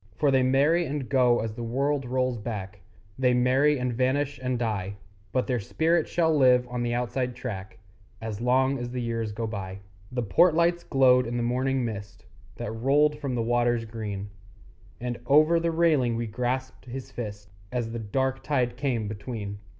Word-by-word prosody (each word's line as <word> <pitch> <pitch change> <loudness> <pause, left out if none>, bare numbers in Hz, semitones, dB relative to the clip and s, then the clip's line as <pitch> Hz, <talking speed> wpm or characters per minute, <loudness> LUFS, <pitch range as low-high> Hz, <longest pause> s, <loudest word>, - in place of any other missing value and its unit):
For 145 -2 +2
they 135 -1 +4
marry 145 +6 +3
and 140 -2 -3
go 125 -3 +3
as 110 -1 -3
the 120 - -7
world 135 +4 0
rolls 125 -1 0
back, 105 -3 -5 0.4
They 125 -1 +3
marry 130 +4 +3
and 125 -1 -1
vanish 135 +3 0
and 125 -1 -1
die; 100 -4 -2 0.4
But 130 - +1
their 125 -2 0
spirit 160 - +1
shall 160 -2 +2
live 125 -3 +5
on 125 0 -3
the 120 0 0
Outside 125 +1 -2
Track 105 -5 -6 0.4
As 110 -1 -5
long 130 +2 +2
as 120 0 -4
the 125 +1 -4
years 115 -2 -2
go 115 +2 -3
by. 95 -3 -5 0.3
The 125 -1 -1
port 160 - +4
lights 170 +1 +2
glowed 125 -2 +4
in 120 +1 -2
the 120 - 0
morning 130 +1 0
mist 105 -2 -7 0.3
That 105 - -5
rolled 145 +6 +2
from 140 -4 -3
the 115 - 0
waters 120 0 +1
green; 105 -3 -5 0.7
And 120 0 -4
over 155 +4 +5
the 170 0 0
railing 155 -8 +2
we 115 0 -2
grasped 125 +4 -3
his 130 +1 -7
fist 105 -4 -7 0.2
As 120 -2 -2
the 115 - -4
dark 130 +5 -1
tide 125 -4 0
came 125 -6 -1
between. 105 -1 -6
125 Hz, 180 wpm, -27 LUFS, 115-135 Hz, 0.7 s, live